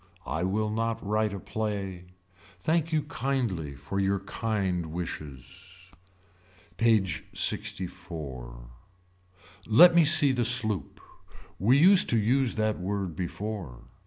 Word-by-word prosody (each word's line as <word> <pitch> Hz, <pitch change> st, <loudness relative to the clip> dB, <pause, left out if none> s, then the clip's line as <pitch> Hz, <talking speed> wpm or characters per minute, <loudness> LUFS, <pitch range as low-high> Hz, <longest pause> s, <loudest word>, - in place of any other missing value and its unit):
I 80 Hz, -, -2 dB
will 105 Hz, +3 st, -1 dB
not 115 Hz, 0 st, -2 dB
write 105 Hz, +1 st, 0 dB
a 100 Hz, -, -5 dB
play. 100 Hz, -4 st, -4 dB, 0.5 s
Thank 165 Hz, -, 0 dB
you 155 Hz, -2 st, +1 dB
kindly 115 Hz, -, -2 dB
for 75 Hz, +8 st, -5 dB
your 100 Hz, 0 st, +1 dB
kind 100 Hz, -5 st, -2 dB
wishes. 90 Hz, +3 st, -8 dB, 0.9 s
PAGE 105 Hz, -7 st, +2 dB
LXIV. 75 Hz, -10 st, -4 dB, 1.0 s
Let 170 Hz, +11 st, +8 dB
me 170 Hz, -1 st, +6 dB
see 155 Hz, -2 st, +5 dB
the 125 Hz, -2 st, 0 dB
sloop. 110 Hz, -, 0 dB, 0.6 s
We 120 Hz, +8 st, +4 dB
used 185 Hz, +5 st, +6 dB
to 120 Hz, -, +3 dB
use 120 Hz, +4 st, +1 dB
that 110 Hz, -1 st, 0 dB
word 95 Hz, -2 st, -3 dB
before. 90 Hz, -, -5 dB
100 Hz, 115 wpm, -27 LUFS, 90-115 Hz, 1.0 s, Let